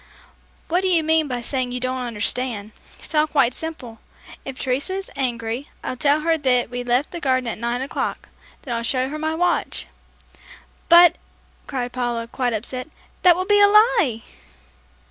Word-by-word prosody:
"What 350 Hz, +3 st, +1 dB
do 380 Hz, -, 0 dB
you 340 Hz, -3 st, +3 dB
mean 320 Hz, -1 st, +2 dB
by 250 Hz, -3 st, -3 dB
saying 255 Hz, 0 st, -2 dB
you 250 Hz, -, -2 dB
don't 255 Hz, +1 st, -2 dB
understand? 230 Hz, -1 st, -2 dB, 0.3 s
It's -, -, -9 dB
all 305 Hz, 0 st, +3 dB
quite 270 Hz, -5 st, +2 dB
simple. 255 Hz, -9 st, -7 dB, 0.4 s
If 270 Hz, -1 st, -7 dB
Teresa 265 Hz, +10 st, -2 dB
is 390 Hz, 0 st, -6 dB
angry, 240 Hz, -1 st, -3 dB
I'll -, -, -3 dB
tell 290 Hz, +4 st, +2 dB
her 325 Hz, 0 st, +1 dB
that 250 Hz, -4 st, +1 dB
we 245 Hz, 0 st, -4 dB
left 245 Hz, +4 st, 0 dB
the 345 Hz, -, -5 dB
garden 260 Hz, -4 st, 0 dB
at 230 Hz, -, -4 dB
nine 240 Hz, +2 st, -2 dB
o'clock; 275 Hz, -, -4 dB, 0.3 s
then 250 Hz, -, -4 dB
I'll 230 Hz, -, -2 dB
show 255 Hz, +2 st, 0 dB
her 305 Hz, +2 st, -5 dB
my 315 Hz, +1 st, -1 dB
watch." 355 Hz, +1 st, 0 dB, 1.0 s
"But," 345 Hz, 0 st, +7 dB, 0.5 s
cried 250 Hz, -3 st, -3 dB
Paula, 240 Hz, -2 st, -2 dB
quite 245 Hz, 0 st, -2 dB
upset, 250 Hz, +5 st, -4 dB, 0.3 s
"that 355 Hz, -2 st, +6 dB
would 370 Hz, +1 st, -2 dB
be 415 Hz, 0 st, +4 dB
a 405 Hz, -, +8 dB
lie!" 420 Hz, -, +3 dB
260 Hz, 175 wpm, -22 LUFS, 245-320 Hz, 1.0 s, a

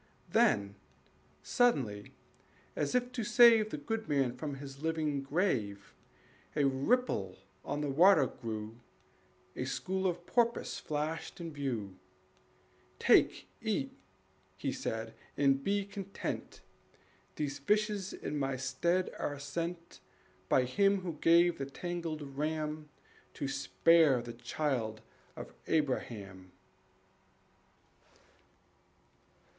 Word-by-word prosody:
Then, 100 Hz, -1 st, +3 dB, 0.7 s
suddenly, 125 Hz, -, +1 dB, 0.6 s
as -, -, -1 dB
if 250 Hz, 0 st, +1 dB
to 245 Hz, -2 st, -3 dB
save 230 Hz, -1 st, +6 dB
The 150 Hz, -, -4 dB
good 220 Hz, +9 st, -4 dB
man 135 Hz, -4 st, +1 dB
from 145 Hz, +1 st, -4 dB
his 135 Hz, 0 st, -9 dB
living 155 Hz, -3 st, 0 dB
grave, 135 Hz, -, -1 dB, 0.6 s
A 150 Hz, -, +2 dB
ripple 135 Hz, -, +1 dB, 0.3 s
on 145 Hz, +1 st, -3 dB
the 150 Hz, -, -1 dB
water 165 Hz, 0 st, +6 dB
grew, 110 Hz, -1 st, -6 dB, 0.8 s
A 130 Hz, -, -3 dB
school 190 Hz, +7 st, -1 dB
of 175 Hz, -1 st, -3 dB
porpoise 235 Hz, +2 st, +1 dB
flashed 155 Hz, +4 st, -3 dB
in 165 Hz, -2 st, -6 dB
view. 115 Hz, -10 st, -4 dB, 1.0 s
"Take, -, -, +4 dB
eat," -, -, -1 dB, 0.6 s
he 135 Hz, +8 st, -2 dB
said, 115 Hz, -2 st, -4 dB, 0.2 s
"and 135 Hz, -1 st, +3 dB
be 200 Hz, 0 st, +1 dB
content; 200 Hz, -1 st, -6 dB, 0.7 s
These 145 Hz, -1 st, -3 dB
fishes 210 Hz, +3 st, +1 dB
in 150 Hz, -, -4 dB
my 135 Hz, -1 st, -1 dB
stead 170 Hz, +8 st, 0 dB
are 145 Hz, -, -2 dB
sent 170 Hz, +4 st, -5 dB, 0.5 s
By 130 Hz, -, +4 dB
Him 195 Hz, +10 st, +2 dB
who 180 Hz, -2 st, -4 dB
gave 170 Hz, 0 st, +5 dB
the 135 Hz, -, -3 dB
tangled 165 Hz, 0 st, -4 dB
ram 150 Hz, +2 st, -3 dB, 0.5 s
To 140 Hz, -, -3 dB
spare 135 Hz, -, +4 dB
the 120 Hz, -1 st, -7 dB
child 120 Hz, -2 st, -2 dB, 0.3 s
of -, -, -8 dB
Abraham." 105 Hz, -, -2 dB
150 Hz, 105 wpm, -32 LUFS, 130-175 Hz, 1.0 s, save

